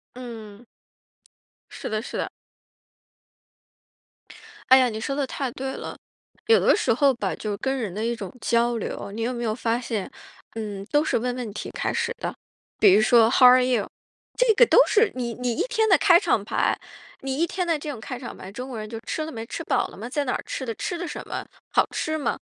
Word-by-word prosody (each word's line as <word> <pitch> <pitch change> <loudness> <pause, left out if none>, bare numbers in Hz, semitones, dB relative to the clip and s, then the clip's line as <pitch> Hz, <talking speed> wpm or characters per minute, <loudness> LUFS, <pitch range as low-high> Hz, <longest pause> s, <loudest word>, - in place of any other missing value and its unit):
嗯。 230 -3 -9 1.1
是 - - -6
的 215 0 -1
是 - - -6
的。 - - -2 2.4
哎 260 - +9
呀， 255 -1 +3
你 220 -1 -5
说 275 +5 -3
得 285 -1 0
太 265 0 -3
对 265 +2 -4
了， - - -7 0.5
有 455 0 +6
的 - - +4
时 410 - +2
候 275 +2 +4
吧， 240 - -2
就 210 -2 -3
跟 265 +4 -1
人 215 -8 -3
的 215 - -3
一 235 - 0
种 195 -5 -7
交 235 0 +2
流， 200 -2 -5
你 225 - -5
有 245 +2 -1
没 240 0 -4
有 215 0 0
发 230 -1 0
现， 225 -5 -4 0.4
嗯， 205 -3 -5
都 295 0 +4
是 - - +1
问 245 +2 -1
问 240 -4 -4
题 210 - -6
开 - - -2
始 - - -1
的。 - - -4 0.4
比 200 -3 +6
如 210 - +6
说 225 0 +5
how 255 - +7
are 255 0 +7
you？ 245 -5 +1 0.5
这 - - +4
个 485 - +7
都 - - +3
是 435 -1 +3
你 240 -2 -3
你 250 -1 -1
一 345 - 0
天 445 -3 +1
的 380 - +7
开 350 -4 +6
场 325 - +1
白， - - 0 0.4
你 270 0 -3
一 335 +2 +2
天 365 +1 -2
的 330 -3 0
这 300 - -6
种 260 -6 -5
开 250 +2 -6
场 245 - -8
白， 190 - -10
中 250 +5 -6
国 245 - -6
人 215 0 -6
就 225 0 -6
吃 315 - -2
了 315 - -7
没？ 225 -2 -6
吃 - - -6
饱 - - +1
了 - - -13
吗？ 230 +4 -6
在 290 +2 -1
哪 250 - 0
儿 - - -3
吃 260 - -4
的？ 230 -2 -4
吃 350 - -3
的 350 0 -4
什 - - -6
么？ - - -4 0.3
好 - - +3
吃 315 0 -2
吗？ 295 - -1
245 Hz, 260 characters per minute, -24 LUFS, 225-285 Hz, 2.4 s, 哎